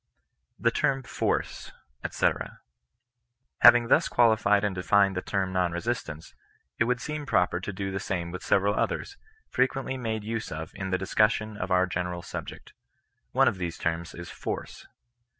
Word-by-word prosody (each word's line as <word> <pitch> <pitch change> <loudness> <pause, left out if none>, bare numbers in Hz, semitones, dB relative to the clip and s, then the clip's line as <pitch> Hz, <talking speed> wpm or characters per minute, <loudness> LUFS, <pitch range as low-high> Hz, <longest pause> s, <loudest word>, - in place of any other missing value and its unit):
THE 115 - +3
TERM 135 +2 0
FORCE, - - -2 0.3
ETC. - - -1 1.0
Having 120 -1 +8
thus - - +4
qualified 110 -3 +3
and 105 -2 0
defined 95 +2 +3
the 90 - -1
term 95 -2 -2
non 90 -2 +1
resist 115 +3 -2
ance, 75 +1 -9 0.5
it 115 - +4
would 125 +1 0
seem 150 0 -5
proper 90 -6 +2
to 90 - -5
do 95 0 -4
the 95 - -2
same 90 -3 -3
with 90 +1 -6
several 100 +1 +2
others, 400 - -2 0.4
frequently 130 +1 0
made 110 -3 -3
use 110 +1 -4
of 80 +1 -5
in 95 -1 -5
the 95 - +1
discussion 105 +3 +1
of 90 -2 -4
our 90 0 +4
general 90 -1 -3
subject. - - -8 0.6
One - - +4
of 95 - 0
these 85 -2 -3
terms 85 0 -3
is 85 0 -8
force. - - -6
100 Hz, 165 wpm, -27 LUFS, 90-115 Hz, 1.0 s, Having